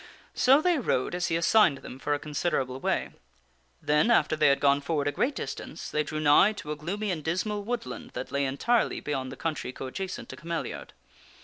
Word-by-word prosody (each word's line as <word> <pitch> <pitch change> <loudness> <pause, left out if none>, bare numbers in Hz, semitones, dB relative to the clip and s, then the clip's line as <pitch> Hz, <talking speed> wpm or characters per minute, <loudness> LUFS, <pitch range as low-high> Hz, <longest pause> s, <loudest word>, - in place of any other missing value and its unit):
So 275 +4 +5
they 355 -4 +3
rode 130 - 0
as 175 0 -1
he 165 - 0
assigned 170 -3 +4
them 130 - -9
for 145 +1 0
a - - -1
considerable 145 -4 -2
way. - - -1 0.7
Then 150 +9 +3
after 235 -8 +3
they 155 - +4
had 140 0 +4
gone 140 0 +3
forward 145 -1 -1
a - - +2
great 260 - 0
distance, - - -6
they 150 - +1
drew 155 0 -4
nigh 155 +8 +5
to 150 -7 -7
a - - -2
gloomy 195 +7 -3
and 160 -4 -3
dismal 200 +6 -1
woodland 240 +2 -5
that - - -5
lay 140 0 0
entirely 220 - +1
beyond 135 -3 -3
the - - -7
country 155 -5 -3
coadjacent 160 +9 -6
to - - -7
Cameliard. 170 -1 -5
155 Hz, 200 wpm, -28 LUFS, 145-205 Hz, 0.7 s, So